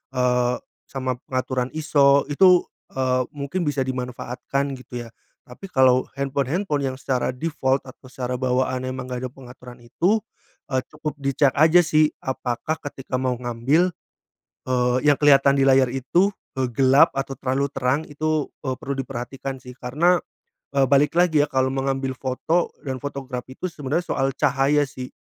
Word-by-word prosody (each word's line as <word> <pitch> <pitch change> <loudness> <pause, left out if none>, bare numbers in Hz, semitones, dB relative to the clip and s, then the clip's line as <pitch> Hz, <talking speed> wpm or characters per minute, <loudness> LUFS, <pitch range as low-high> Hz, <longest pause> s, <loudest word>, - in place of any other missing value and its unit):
eee, 125 0 +2 0.3
sama 130 -2 -3
pengaturan 130 -1 -1
ISO, 140 -3 +4
itu, 180 +3 +6 0.3
eee, 130 -1 +1
mungkin 145 +6 -3
bisa 140 -2 0
dimanfaatkan 130 +2 -3
gitu 125 -1 -7
ya. - - -13 0.4
Tapi 125 +10 -14
kalau 130 -1 +4
handphone-handphone 140 +3 -1
yang 130 - -8
secara 130 -1 -1
default 135 -1 0
atau 130 0 -13
secara 125 -1 -3
bawaannya 130 0 0
emang 130 -1 -6
enggak 125 0 -5
ada - - -15
pengaturan 125 -1 -13
itu, 185 - +1 0.5
eee, 130 0 +1
cukup 155 -1 -5
di 140 0 0
cek 140 -3 +4
aja 160 +4 +6
sih 155 -2 +3
apakah 130 +3 -2 0.2
ketika 130 -1 -6
mau 130 -1 0
ngambil, 130 +9 +1 0.8
eee, 125 0 +2
yang 145 - +6
kelihatan 140 -1 +5
di - - +4
layar 130 -2 +5
itu, 170 +10 +2 0.3
eee, 130 - +2
gelap 135 +2 +5
atau 135 0 -3
terlalu 135 +2 0
terang, 135 +3 0
itu, 155 0 -1 0.2
eee, 130 - 0
perlu 140 +1 -4
diperhatikan 135 +1 -5
sih 125 0 -10
karena, 165 +8 +2 0.6
eee, 135 -1 +4
balik 145 +3 +4
lagi 165 -4 +4
ya - - -18
kalau 130 0 +1
mengambil 135 0 -1
foto 145 +6 -1
dan 130 -1 -3
photograph 135 -3 -5
itu 180 +8 -5
sebenarnya 155 +3 -2
soal 135 -1 0
cahaya 145 +1 +2
sih. 130 -1 -8
135 Hz, 155 wpm, -23 LUFS, 130-145 Hz, 0.8 s, itu